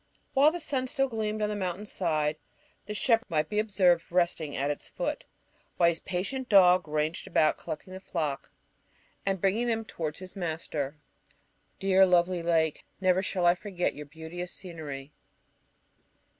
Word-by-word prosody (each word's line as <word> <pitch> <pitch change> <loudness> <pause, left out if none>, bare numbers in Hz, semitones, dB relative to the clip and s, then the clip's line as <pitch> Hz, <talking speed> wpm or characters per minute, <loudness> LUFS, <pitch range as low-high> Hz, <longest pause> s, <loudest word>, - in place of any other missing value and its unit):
While 285 +3 +6
the 350 - -4
sun 270 -5 -1
still 270 +1 +1
gleamed 215 -3 -2
on 210 - +1
the 210 - -2
mountain's 195 +1 -3
side 155 -4 0 0.5
the 210 - -4
shepherd 230 +3 +2
might 155 -2 0
be 210 - 0
observed 185 -6 +2
resting 170 -4 +1
at 140 +2 0
its 145 - -5
foot, - - -3 0.5
while 170 - +5
his 165 -1 -2
patient 220 +8 -3
dog 180 -4 +6
ranged 155 +2 -1
about 155 - +2
collecting 185 +4 -7
the 190 - -6
flock, 155 -7 -3 0.8
and 195 -1 +1
bringing 200 +6 +1
them 225 -1 0
towards 155 -7 -4
his 185 +1 -8
master. 160 -5 -3 0.8
Dear, 190 0 +5
lovely 180 0 +3
lake! 165 -2 +1 0.2
Never 185 -1 +3
shall 185 -2 -1
I 175 - +7
forget 180 -1 -2
your 150 0 -9
beauteous 160 +3 -7
scenery. 150 -6 -7
180 Hz, 155 wpm, -29 LUFS, 160-205 Hz, 0.8 s, I